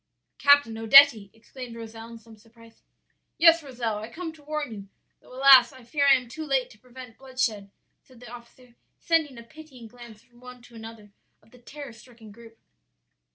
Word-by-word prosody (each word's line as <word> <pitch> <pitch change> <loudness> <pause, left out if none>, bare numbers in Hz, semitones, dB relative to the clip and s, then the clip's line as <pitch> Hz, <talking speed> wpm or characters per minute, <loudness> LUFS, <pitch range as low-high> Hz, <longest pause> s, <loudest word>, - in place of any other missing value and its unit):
"'Captain 285 -5 +3
Odetti!' 225 -3 +5
exclaimed 240 +1 -12
Rozel 225 0 -11
in 230 - -12
some 225 0 -18
surprise. 230 +1 -22 0.6
"'Yes, 330 0 +5
Rozel, 240 -7 -5
I 215 +2 -9
come 325 +5 -8
to 315 - -20
warn 300 -3 -5
you, 200 -2 -11 0.3
though, - - -22
alas! 260 -2 +5
I 260 -2 -17
fear 280 +4 -1
I 275 - +6
am 250 -2 -5
too 310 +7 -9
late 270 -4 -2
to 210 - -20
prevent 250 -1 -15
bloodshed,' 255 -7 -4 0.3
said 255 -3 -22
the 240 -1 -14
officer, 245 +1 -16 0.2
sending 315 -6 -2
a 235 - -12
pitying 275 -2 -16
glance 235 -2 -16
from 240 -1 -26
one 250 -1 -14
to 245 - -19
another 225 -2 -13 0.3
of 220 - -27
the 250 - -19
terror 275 +1 -12
stricken 230 -2 -17
group. 225 +1 -17
245 Hz, 185 wpm, -24 LUFS, 225-275 Hz, 0.6 s, I